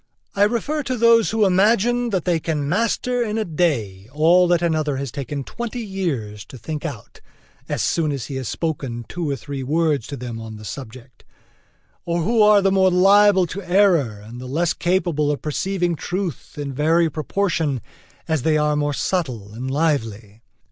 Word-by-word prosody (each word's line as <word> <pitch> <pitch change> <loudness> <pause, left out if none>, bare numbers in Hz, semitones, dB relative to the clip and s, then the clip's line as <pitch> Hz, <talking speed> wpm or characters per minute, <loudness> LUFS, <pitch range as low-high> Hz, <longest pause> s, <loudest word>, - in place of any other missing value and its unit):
I 200 +1 +4
refer 245 +8 -1
to 260 -3 -3
those 230 -1 +5
who 220 -1 +2
imagine 225 +5 +3
that 190 -6 -1
they 175 -2 +2
can 150 -3 -2
master 230 - 0
in 220 -2 -1
a 220 - 0
day 120 - -1
all 170 +5 +4
that 175 -1 +2
another 155 -4 0
has 135 -2 -4
taken 140 +1 -5
twenty 235 - -5
years 135 - -3
to 130 - -11
think 150 +6 -6
out, 140 -10 -8 0.5
as - - -1
soon 160 -3 +1
as 135 -4 -4
he 135 - -5
has 130 -3 -4
spoken 135 -8 -3
two 170 -4 -4
or 140 - 0
three 140 +1 -6
words 150 -2 0
to 140 - -6
them 120 -2 -6
on 110 -1 -8
the 105 0 -11
subject; 130 0 -9 0.8
or 170 -1 -1
who 225 +5 +2
are 210 -1 +6
the 195 - +3
more 190 -1 +4
liable 195 +1 +5
to 185 +4 -6
error 175 - +2
and 120 +3 -9
the 130 - -7
less 165 +6 0
capable 175 -4 0
of 145 - -4
perceiving 175 +3 -1
truth 175 -2 -5
in 140 -2 -4
very 165 +4 +3
proportion 160 -1 -1 0.5
as 160 -3 0
they 155 +3 +2
are 150 0 +1
more 145 0 0
subtle 125 - -2
and 125 +4 -5
lively. 115 -8 -1
160 Hz, 180 wpm, -21 LUFS, 135-190 Hz, 0.8 s, are